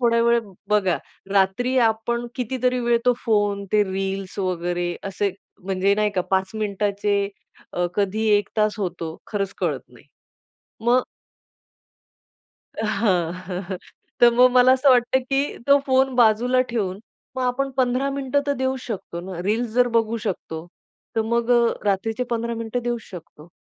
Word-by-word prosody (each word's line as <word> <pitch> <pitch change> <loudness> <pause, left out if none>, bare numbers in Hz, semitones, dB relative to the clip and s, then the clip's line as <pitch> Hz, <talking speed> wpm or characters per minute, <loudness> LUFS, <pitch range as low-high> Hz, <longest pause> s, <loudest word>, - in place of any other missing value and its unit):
थोड्या 235 -1 +3
वेळ 235 0 +4 0.3
बघा. 195 -4 +2 0.4
रात्री 200 +7 +2
आपण 230 +2 0
कितीतरी 250 0 -1
वेळ 235 -1 +2
तो 250 - +5
फोन 205 -3 +1
ते 210 -1 +5
रील्स 195 0 -4
वगैरे 175 -1 -1
असे 195 +1 -1 0.3
म्हणजे 195 +1 +2
नाही 210 0 +1
का? 190 -2 0
5 190 0 +1
मिनिटाचे 205 -1 0 0.4
अ, 180 0 0
कधी 210 +2 0
1 205 - -1
तास 215 0 +2
होतो 170 -4 -4
खरचं 200 -2 -2
कळत - - 0
नाही. - - -19 0.8
मग 250 +1 +4 1.8
हां. 190 -6 +1
हं, 185 +1 -6
हं. 190 - -3 0.4
तर 240 0 +8
मग 250 +1 +6
मला 255 0 +6
असं 265 +1 +4
वाटतं 250 +1 +4
की 275 +2 0
तो 280 0 +6
फोन 265 0 +3
बाजूला 245 +2 +4
ठेवून 200 -5 -2 0.4
मग 260 - -1
आपण 260 +2 0
15 255 +1 +1
मिनिटं 275 0 0
तर 285 - +2
देऊ 260 0 -1
शकतो 185 -6 -5
ना. 180 -1 -7
रील्स 225 +5 0
जर 245 0 +4
बघू 225 0 +1
शकतो. 165 -4 -4 0.5
तर 225 - +3
मग 235 +1 0
अ, 235 -1 +4
रात्रीचे 220 +5 0
15 235 0 -1
मिनिटं 230 +2 -3
देऊचं 240 -2 -2
शकतो. 165 -3 -11
220 Hz, 150 wpm, -23 LUFS, 195-245 Hz, 1.8 s, तर